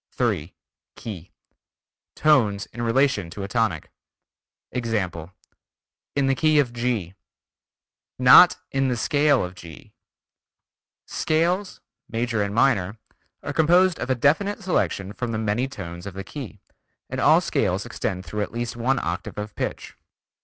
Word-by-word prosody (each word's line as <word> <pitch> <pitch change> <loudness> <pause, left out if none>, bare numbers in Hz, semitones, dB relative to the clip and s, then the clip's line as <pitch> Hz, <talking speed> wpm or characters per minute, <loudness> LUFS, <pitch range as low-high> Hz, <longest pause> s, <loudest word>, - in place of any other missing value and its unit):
3. 100 - -1 0.4
Key: 95 -6 -8 0.9
Tones 115 -10 +3
in 120 - -6
relation 120 -5 +1
to 100 +4 -7
a - - -4
tonic. 105 -7 -1 0.8
Example: 95 -9 -3 0.8
In 140 -1 +2
the 135 - +3
key 155 +3 +2
of 130 -5 +2
G. 115 -7 -2 1.0
Not 130 +8 +8
in 135 0 +1
the 125 -2 -1
scale 145 0 +2
of 90 - -8
G. 85 -4 -13 1.1
Scales, 175 +5 -1 0.3
major 115 -1 -1
and 100 0 -2
minor 115 -5 +2 0.5
are - - -4
composed 175 +3 +4
of - - -4
a 130 - +2
definite 195 - +1
selection 100 - -1
from 120 +1 -4
the - - -1
many 110 +4 0
tones 90 -6 -8
of 95 - -8
the 95 - -5
key, 115 -8 -9 0.5
and - - -4
all - - +6
scales - - -1
extend 95 0 -4
through 105 +6 -4
at 105 - -3
least 120 0 -4
one 125 +3 0
octave 85 -5 -4
of 105 0 -5
pitch. - - -5
115 Hz, 140 wpm, -24 LUFS, 100-135 Hz, 1.1 s, Not